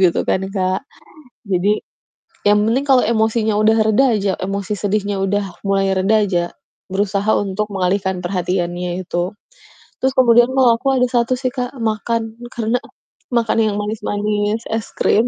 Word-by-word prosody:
gitu 180 -3 +3
kan, 190 - +1
Kak. 185 -1 0 0.7
Jadi, 200 +3 +1 0.7
yang 210 0 +5
penting 255 +5 +1
kalau 265 -3 +5
emosinya 220 -1 +1
udah 215 +1 +4
reda 220 +5 +4
aja, 200 -1 0
emosi 195 +2 -3
sedihnya 205 -1 -1
udah 200 +1 0 0.2
mulai 195 0 +2
reda 200 +4 +3
aja, 175 -3 0 0.5
berusaha 200 +1 0
untuk 205 +1 -2
mengalihkan 190 0 0
perhatiannya 175 -1 -2
itu. 175 +3 -2 0.7
Terus 265 0 +1
kemudian 240 -1 +6
mah 250 -3 +4
aku 270 +1 +1
ada 250 0 +3
1 240 +1 +1
sih 255 -1 -1
Kak, 250 0 -4
makan 225 +1 -2
karena 230 +1 0 0.6
makan 235 -2 +1
yang 215 -2 0
manis-manis, 210 +1 -1
es 225 0 -2
krim, 225 +3 +2
210 Hz, 145 wpm, -19 LUFS, 195-230 Hz, 0.7 s, kemudian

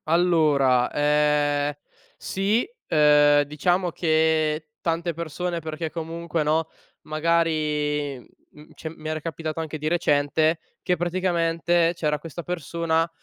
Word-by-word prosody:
Allora, 155 -7 +3
ehm, 150 0 +2 0.4
sì, 200 +5 0 0.2
ehm, 150 -1 +5
diciamo 175 +5 0
che 155 -2 +1
tante 170 0 -1
persone 170 +2 -3
perché 160 +1 -5
comunque, 165 0 -3
no, 160 +2 +1 0.3
magari, 155 -3 0
mhmm 150 +4 -19
cioè 160 - -7
mi 155 0 -7
era 155 0 -2
capitato 160 0 -4
anche 160 -1 -5
di 150 +1 -2
recente, 155 -1 +2 0.2
che 180 - +1
praticamente 170 -1 +1
c’era 150 -3 -1
questa 165 +2 -8
persona 165 -1 -1
160 Hz, 115 wpm, -24 LUFS, 150-170 Hz, 0.4 s, ehm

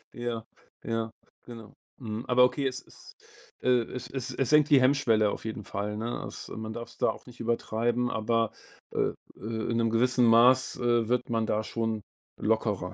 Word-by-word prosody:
Ja, 120 -2 -4 0.4
ja, 115 -1 -2 0.4
genau. 115 -3 -11 0.3
Mhm, 110 -2 -5
aber 125 0 +5
okay, 135 +2 +2
es 130 0 -3
es - - -14 0.5
äh, - - +1 0.2
es 125 -1 -5
es 130 -3 -3
es 135 - 0
senkt 150 -1 +5
die 145 -3 +7
Hemmschwelle 120 -6 +3
auf - - -6
jeden 110 -1 -4
Fall, 105 +1 -4
ne? 115 +2 -3
As - - -7
man 110 0 -6
darf's 115 0 -8
da - - +2
auch - - -6
nicht 125 -1 -14
übertreiben, 120 +1 0
aber, 115 0 +1 0.4
äh - - +1 0.2
äh, 110 +2 -3
in 115 - 0
'nem 115 -1 +2
gewissen 125 +2 +3
Maß, 120 +3 +5
äh, 120 -2 +2
wird 125 0 0
man 115 -1 0
da 110 +1 0
schon 110 -1 -2 0.4
lockerer. 105 -4 0
115 Hz, 180 wpm, -28 LUFS, 110-125 Hz, 0.5 s, die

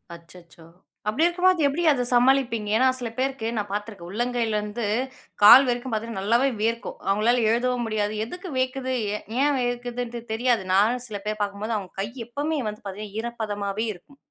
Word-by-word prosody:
அச்சச்சோ! 170 -1 -16 0.4
அப்பிடி 265 +10 +2
இருக்கும்போது 355 -2 +3
எப்பிடி 300 +5 -1
அத 250 -4 +1
சமாளிப்பீங்க? 245 -4 +3
ஏன்னா 260 +2 +4
சில 240 -2 -3
பேருக்கு 260 -3 -1
நான் 205 -1 -2
பார்த்துருக்கேன். 205 -4 -5
உள்ளங்கையிலேருந்து, 225 -1 -1 0.6
கால் 250 +6 +10
வரைக்கும் 245 0 -2
பார்த்தீங்கன்னா 220 -2 -3
நல்லாவே 235 +6 +3
வேர்க்கும். 230 +2 -2
அவங்களால 225 +5 +2
எழுதவும் 245 0 0
முடியாது. 210 -1 -1
எதுக்கு 360 - -8
வியர்க்குது? 260 0 -1 0.2
ஏ - - -4 0.2
ஏன் 290 0 +3
வியர்க்குதுண்ட்டு 245 -1 -3
தெரியாது. 235 -2 +1
நானும் 235 +5 +2
சில 210 -3 -5
பேர் 215 0 -2
பார்க்கும்போது, 205 +2 -2
அவுங்க 190 -3 -8
கை 200 - -2 0.2
எப்பவுமே 290 +5 -2
வந்து 210 0 -9
பார்த்தீங்கன்னா 205 +2 -7
ஈரப்பதமாவே 215 -3 -3
இருக்கும். 240 +10 -19
235 Hz, 155 wpm, -25 LUFS, 210-255 Hz, 0.6 s, கால்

